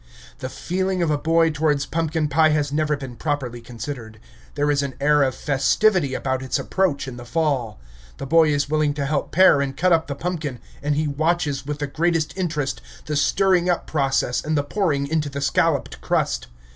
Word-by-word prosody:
The 130 Hz, -, -4 dB
feeling 185 Hz, +4 st, -1 dB
of 160 Hz, -, +1 dB
a 150 Hz, -, +2 dB
boy 165 Hz, +1 st, +3 dB
towards 150 Hz, -2 st, +1 dB
pumpkin 160 Hz, -1 st, -1 dB
pie 155 Hz, +2 st, +4 dB
has 150 Hz, -2 st, 0 dB
never 150 Hz, -1 st, +1 dB
been 130 Hz, -3 st, -8 dB
properly 135 Hz, -5 st, -3 dB
considered. 115 Hz, -1 st, -7 dB, 0.4 s
There 145 Hz, 0 st, +1 dB
is 145 Hz, -1 st, +2 dB
an 140 Hz, -1 st, -4 dB
air 150 Hz, +1 st, +3 dB
of 130 Hz, -2 st, +1 dB
festivity 145 Hz, +2 st, +2 dB
about 130 Hz, -1 st, -2 dB
its 130 Hz, -, -1 dB
approach 170 Hz, -8 st, 0 dB
in 125 Hz, -2 st, -7 dB
the 120 Hz, -, -8 dB
fall. 130 Hz, -, -1 dB, 0.4 s
The -, -, -5 dB
boy 160 Hz, +2 st, +4 dB
is 145 Hz, -1 st, 0 dB
willing 150 Hz, -1 st, +1 dB
to 140 Hz, -2 st, -2 dB
help 140 Hz, 0 st, -1 dB
pare 185 Hz, -5 st, +6 dB
and 135 Hz, -1 st, -3 dB
cut 180 Hz, +2 st, +3 dB
up 165 Hz, -1 st, +2 dB
the 140 Hz, -, -4 dB
pumpkin, 155 Hz, -5 st, -3 dB, 0.2 s
and 145 Hz, 0 st, 0 dB
he 155 Hz, +1 st, 0 dB
watches 145 Hz, -2 st, -1 dB
with 150 Hz, -1 st, -3 dB
the 145 Hz, -, -2 dB
greatest 160 Hz, +2 st, 0 dB
interest 155 Hz, -7 st, -2 dB, 0.2 s
the 150 Hz, -, -3 dB
stirring 180 Hz, +4 st, +2 dB
up 175 Hz, -, 0 dB
process 135 Hz, -4 st, 0 dB
and 155 Hz, 0 st, 0 dB
the 145 Hz, -, +1 dB
pouring 145 Hz, -4 st, 0 dB
into 150 Hz, 0 st, -1 dB
the 140 Hz, 0 st, -5 dB
scalloped 140 Hz, -, 0 dB
crust. -, -, -1 dB
150 Hz, 195 wpm, -22 LUFS, 140-160 Hz, 0.4 s, pare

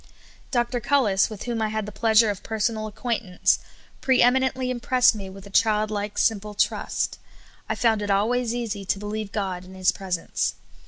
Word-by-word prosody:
Dr. 240 Hz, -1 st, 0 dB
Cullis, 235 Hz, -6 st, +2 dB
with 215 Hz, -3 st, -7 dB
whom 235 Hz, -2 st, -2 dB
I 220 Hz, -, +1 dB
had 215 Hz, -1 st, -2 dB
the 210 Hz, -, -7 dB
pleasure 220 Hz, +1 st, +4 dB
of 200 Hz, -, -7 dB
per 220 Hz, -, -5 dB
sonal 215 Hz, 0 st, 0 dB
acquaintance, 215 Hz, -4 st, 0 dB, 0.4 s
pre 260 Hz, -1 st, +3 dB
eminently 260 Hz, 0 st, +2 dB
impressed 250 Hz, 0 st, +3 dB
me 200 Hz, -3 st, -7 dB
with 195 Hz, +1 st, -11 dB
a 200 Hz, -, -12 dB
child 215 Hz, 0 st, +2 dB
like, 205 Hz, 0 st, -3 dB
simple 210 Hz, -1 st, +1 dB
trust. -, -, -1 dB, 0.5 s
I -, -, 0 dB
found 225 Hz, -3 st, +2 dB
it 205 Hz, -, -3 dB
always 230 Hz, +4 st, +1 dB
easy 220 Hz, -4 st, -3 dB
to 195 Hz, -, 0 dB
be 205 Hz, -, -8 dB
lieve 210 Hz, -1 st, -4 dB
God 190 Hz, -3 st, -3 dB
in 185 Hz, +1 st, -12 dB
His 185 Hz, -1 st, +3 dB
presence. 185 Hz, -3 st, -2 dB
215 Hz, 190 wpm, -24 LUFS, 200-240 Hz, 0.5 s, pleasure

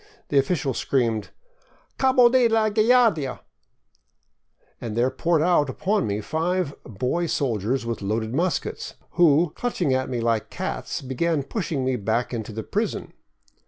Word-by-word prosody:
The 140 Hz, -, +4 dB
official 135 Hz, -2 st, 0 dB
screamed, 115 Hz, -4 st, 0 dB, 0.3 s
" -, -, -35 dB
Cabo 260 Hz, -2 st, +5 dB
de 245 Hz, 0 st, +4 dB
la 225 Hz, -1 st, +2 dB
Guardia! 215 Hz, -, +3 dB, 0.8 s
", -, -, -42 dB
and 115 Hz, -2 st, -5 dB
there 125 Hz, +2 st, +2 dB
poured 165 Hz, -2 st, +1 dB
out 170 Hz, -5 st, +3 dB
upon 200 Hz, -, 0 dB
me 105 Hz, +1 st, -2 dB
five 165 Hz, -, -1 dB
boy 125 Hz, -, -2 dB
soldiers 120 Hz, -3 st, -1 dB
with 115 Hz, -2 st, -3 dB
loaded 110 Hz, +3 st, -2 dB
muskets, 170 Hz, +5 st, -2 dB, 0.2 s
who, 165 Hz, -1 st, +4 dB
clutching 180 Hz, -, -1 dB
at 130 Hz, 0 st, 0 dB
me 125 Hz, -, -2 dB
like 115 Hz, -2 st, 0 dB
cats, -, -, -4 dB
began 140 Hz, +4 st, 0 dB
pushing 160 Hz, -, -3 dB
me 130 Hz, -1 st, 0 dB
back 115 Hz, +4 st, -1 dB
into 110 Hz, -2 st, -4 dB
the 110 Hz, +1 st, -5 dB
prison. -, -, -3 dB
140 Hz, 150 wpm, -24 LUFS, 115-180 Hz, 0.8 s, Cabo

